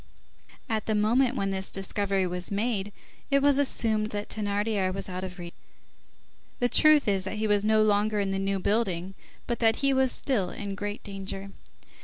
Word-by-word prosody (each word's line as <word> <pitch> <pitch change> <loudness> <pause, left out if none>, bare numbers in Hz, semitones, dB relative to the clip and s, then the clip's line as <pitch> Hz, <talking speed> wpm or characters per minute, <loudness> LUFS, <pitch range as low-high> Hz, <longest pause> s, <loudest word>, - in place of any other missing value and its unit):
At 220 -4 -2
the 220 - +1
moment 240 +5 +2
when 195 -5 -1
this 190 0 -2
discovery 195 0 -1
was 180 0 -4
made, 205 -1 -1 0.4
it 275 -1 +4
was 285 -1 +4
assumed 220 -6 0
that 205 0 -5
Thénardier 205 -2 -1
was 195 +1 -5
out 185 0 -5
of 185 -1 -6
reach. 175 -1 -8 1.1
The 245 - +3
truth 305 -1 +5
is, 195 -2 +1
that 195 - -4
he 215 - -1
was 205 -1 +2
no 215 0 +4
longer 210 0 +2
in 195 -1 0
the 195 - -1
New 195 0 0
Building, 190 -3 -1 0.3
but 235 - -3
that 225 -1 +4
he 275 - +4
was 265 -1 +3
still 210 -10 -1
in 200 +1 -5
great 205 +1 -5
danger. 195 0 -6
205 Hz, 185 wpm, -27 LUFS, 195-225 Hz, 1.1 s, truth